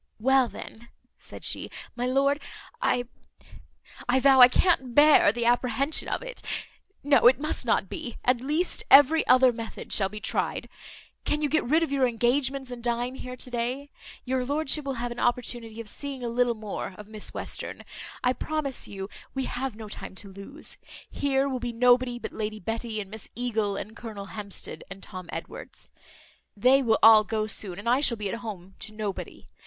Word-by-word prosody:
"Well, 265 Hz, +2 st, +4 dB
then," 235 Hz, 0 st, -11 dB, 0.3 s
said -, -, -10 dB
she, -, -, -1 dB, 0.3 s
"my 245 Hz, +1 st, -1 dB
lord, 275 Hz, +3 st, +2 dB, 0.4 s
I 250 Hz, -, +2 dB, 1.1 s
I 260 Hz, +2 st, +4 dB
vow, 265 Hz, 0 st, +6 dB
I 245 Hz, -, +12 dB
can't 260 Hz, -3 st, +1 dB
bear 295 Hz, -7 st, +7 dB
the 235 Hz, +1 st, -2 dB
apprehension 250 Hz, +4 st, +1 dB
of -, -, -2 dB
it. -, -, -6 dB, 0.6 s
No, 280 Hz, -3 st, +5 dB
it 255 Hz, +2 st, +5 dB
must 305 Hz, -4 st, -2 dB
not 195 Hz, -, +2 dB
be. 235 Hz, +5 st, -6 dB
At 245 Hz, -1 st, +3 dB
least 305 Hz, +7 st, 0 dB
every 290 Hz, +4 st, +7 dB
other 255 Hz, 0 st, +6 dB
method 230 Hz, -1 st, -6 dB
shall 195 Hz, -2 st, +4 dB
be 210 Hz, +2 st, -8 dB
tried. 220 Hz, -, -2 dB, 0.5 s
Can 300 Hz, 0 st, -1 dB
you 295 Hz, -, +1 dB
get 315 Hz, +1 st, +2 dB
rid 315 Hz, +7 st, +3 dB
of 320 Hz, -, -2 dB
your 270 Hz, -2 st, +3 dB
engagements, 255 Hz, +3 st, 0 dB
and 240 Hz, -1 st, -8 dB
dine 240 Hz, +1 st, -1 dB
here 255 Hz, -1 st, -7 dB
to 250 Hz, 0 st, -2 dB
day? 250 Hz, +4 st, -3 dB, 0.3 s
Your 260 Hz, 0 st, 0 dB
lordship 290 Hz, +2 st, 0 dB
will 275 Hz, -1 st, -2 dB
have 240 Hz, 0 st, -3 dB
an 240 Hz, -, -6 dB
opportunity 240 Hz, -2 st, -1 dB
of 230 Hz, -, -7 dB
seeing 275 Hz, +3 st, -6 dB
a 240 Hz, -, -2 dB
little 240 Hz, 0 st, +1 dB
more 210 Hz, -3 st, -6 dB
of 210 Hz, -, -10 dB
Miss 215 Hz, -1 st, -6 dB
Western. -, -, -5 dB, 0.4 s
I 250 Hz, 0 st, +3 dB
promise 285 Hz, 0 st, -3 dB
you 195 Hz, -1 st, -6 dB, 0.3 s
we 265 Hz, -1 st, -1 dB
have 255 Hz, -2 st, -3 dB
no 220 Hz, -1 st, -8 dB
time 205 Hz, -, -8 dB
to 195 Hz, 0 st, -8 dB
lose. 200 Hz, +11 st, -9 dB, 0.3 s
Here 275 Hz, -1 st, +1 dB
will 260 Hz, -2 st, -2 dB
be 240 Hz, -1 st, -4 dB
nobody 245 Hz, +1 st, +3 dB
but -, -, -7 dB
Lady 215 Hz, 0 st, -4 dB
Betty, 225 Hz, +2 st, -4 dB
and 200 Hz, -1 st, -7 dB
Miss 220 Hz, 0 st, -7 dB
Eagle, 220 Hz, -4 st, -1 dB
and 215 Hz, +2 st, -6 dB
Colonel 210 Hz, -4 st, -8 dB
Hampsted, 200 Hz, +1 st, -7 dB
and 195 Hz, 0 st, -10 dB
Tom 185 Hz, -3 st, -8 dB
Edwards; -, -, -8 dB, 0.7 s
they 255 Hz, +6 st, +5 dB
will 225 Hz, -4 st, +3 dB
all 220 Hz, -1 st, +9 dB
go 215 Hz, 0 st, -1 dB
soon 200 Hz, -4 st, -4 dB
and 205 Hz, -, -7 dB
I 245 Hz, +3 st, +4 dB
shall 240 Hz, -5 st, +4 dB
be 210 Hz, -2 st, -3 dB
at 230 Hz, -, -4 dB
home 195 Hz, -5 st, -8 dB
to 215 Hz, 0 st, -6 dB
nobody. 210 Hz, -3 st, -5 dB
245 Hz, 190 wpm, -27 LUFS, 220-270 Hz, 1.1 s, I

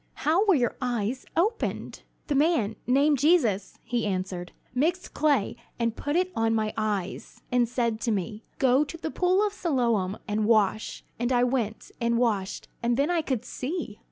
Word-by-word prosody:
"How 330 Hz, +6 st, +4 dB
were 390 Hz, -, +6 dB
your 245 Hz, -4 st, +1 dB
eyes 245 Hz, 0 st, -2 dB
opened?" 425 Hz, +7 st, -1 dB, 0.2 s
"The 295 Hz, -, -1 dB
man, 280 Hz, -7 st, +2 dB
named 280 Hz, +2 st, +4 dB
Jesus," 240 Hz, -, +2 dB
he 235 Hz, -3 st, -1 dB
answered, 185 Hz, -2 st, -3 dB, 0.2 s
"mixed 340 Hz, +8 st, 0 dB
clay, 285 Hz, -8 st, +2 dB, 0.2 s
and 230 Hz, -1 st, 0 dB
put 290 Hz, +1 st, -2 dB
it 365 Hz, +1 st, +2 dB
on 225 Hz, 0 st, +2 dB
my 215 Hz, -1 st, 0 dB
eyes, 205 Hz, -4 st, -3 dB
and 245 Hz, -2 st, +3 dB
said 235 Hz, -2 st, -1 dB
to 230 Hz, -, 0 dB
me, 210 Hz, +2 st, -2 dB, 0.2 s
'Go 265 Hz, +2 st, +4 dB
to 300 Hz, +3 st, -7 dB
the 320 Hz, -1 st, -4 dB
pool 370 Hz, +3 st, +2 dB
of 410 Hz, -, -2 dB
Siloam 235 Hz, -, 0 dB
and 210 Hz, 0 st, 0 dB
wash,' 215 Hz, -1 st, +1 dB, 0.2 s
and 240 Hz, +2 st, 0 dB
I 245 Hz, -1 st, +4 dB
went 240 Hz, -4 st, -1 dB
and 235 Hz, 0 st, +2 dB
washed, 210 Hz, -6 st, 0 dB
and 235 Hz, 0 st, +1 dB
then 285 Hz, +5 st, +2 dB
I 340 Hz, -2 st, +2 dB
could 255 Hz, -6 st, -2 dB
see." 265 Hz, -, -4 dB
245 Hz, 175 wpm, -27 LUFS, 215-300 Hz, 0.2 s, were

